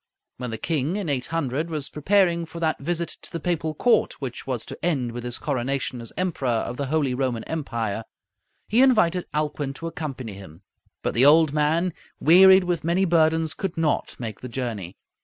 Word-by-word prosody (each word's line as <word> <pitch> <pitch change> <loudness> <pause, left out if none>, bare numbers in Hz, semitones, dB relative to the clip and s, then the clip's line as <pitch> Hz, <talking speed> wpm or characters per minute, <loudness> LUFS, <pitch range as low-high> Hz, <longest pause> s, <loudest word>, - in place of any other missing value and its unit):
When 125 0 -4
the 115 - -4
king, 155 - -1
in 200 -6 -2
800, 145 +2 -1
was 150 -4 -2
preparing 170 +1 +2
for 170 +1 -8
that 160 -1 0
visit 170 +3 -2
to - - -11
the 170 - -4
Papal 160 -2 -1
court 240 +9 +2
which 130 -2 -6
was 125 -4 -3
to - - -10
end 135 -9 0
with 120 0 -6
his 120 0 -4
coronation 135 -2 -2
as 115 - -8
Emperor 180 -7 -1
of 120 +1 -1
the 140 - -2
Holy 145 -3 +1
Roman 125 -3 -1
Empire, 115 -9 -3 0.6
he 230 +4 +3
invited 185 -9 +3
Alcuin 150 -2 -2
to 165 - -8
accompany 135 -9 -5
him. 95 -3 -12 0.4
But - - -1
the 130 +4 +5
old 155 0 +6
man, 160 +4 +1 0.3
wearied 190 +4 +7
with 175 -2 -1
many 175 +4 +2
burdens, 160 -2 +2
could 190 -4 -4
not 160 -2 0
make 110 -4 -6
the 125 - -7
journey. 115 -8 -4
150 Hz, 185 wpm, -24 LUFS, 125-170 Hz, 0.6 s, wearied